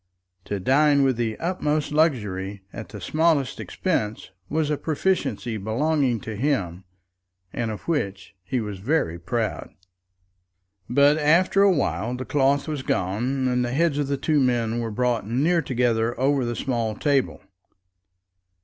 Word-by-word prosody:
To 100 - -3
dine 140 +6 +4
with 135 -2 +2
the 115 -2 -1
utmost 155 -4 -1
luxury 105 - 0
at 110 - -8
the 105 - -8
smallest 155 - +1
expense 110 - -2 0.2
was 155 0 0
a - - +2
proficiency 155 -8 -1
belonging 125 +4 0
to 110 - -6
him, 100 - -1 0.7
and 115 -2 -2
of 110 - -5
which 100 - -2
he 125 +7 -2
was 105 -3 -5
very 100 - 0
proud. 110 +5 -3 1.2
But 140 +4 +4
after 170 +6 +4
a 200 -1 +6
while 110 - -1
the 130 +1 -5
cloth 140 +1 +1
was 150 -3 -3
gone, 125 +6 -1
and 125 0 +1
the 120 0 -2
heads 155 0 +1
of 145 - 0
the 140 0 -1
two 150 +2 +1
men 120 -3 +1
were 115 -1 -2
brought 120 -1 -1
near 155 +8 +2
together 120 -3 0
over 135 -1 +2
the 120 0 -2
small 115 -5 -2
table. 140 +1 0
125 Hz, 150 wpm, -24 LUFS, 110-150 Hz, 1.2 s, a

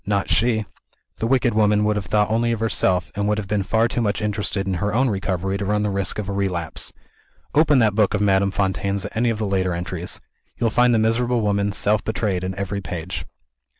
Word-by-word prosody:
Not 100 -1 -1
she! 110 -2 +2 0.5
The 115 - -1
wicked 125 -2 +2
woman 105 -1 +3
would 105 0 +1
have 100 -3 -3
thought 105 +1 +2
only 115 +1 +1
of 115 - -1
herself, 95 -4 +1
and 100 0 -1
would 105 0 +1
have 105 -2 -4
been 105 0 0
far 110 +4 +2
too 120 - -2
much 105 -2 0
interested 105 -2 -2
in 95 - -1
her 105 +1 0
own 130 0 +3
recovery 95 0 -2
to 100 - -2
run 105 +1 +1
the 105 - 0
risk 100 -1 -1
of 105 -3 -3
a 100 - -3
relapse. 90 -5 -3 0.6
Open 150 -1 +4
that 110 -4 +4
book 105 0 +2
of 105 - -1
Madame 100 -1 +3
Fontaine's 100 0 -1
at - - -8
any 120 +2 +2
of 115 - -1
the 110 - -2
later 95 -2 0
entries. 90 0 -5 0.4
You - - -1
will 115 - +2
find 125 0 +4
the - - +3
miserable 115 +2 +1
woman 100 -1 +1
self 105 +1 +1
betrayed 105 -4 -1
in 95 0 -3
every 100 +1 -3
page." 90 -1 -5
105 Hz, 230 wpm, -22 LUFS, 95-110 Hz, 0.6 s, Open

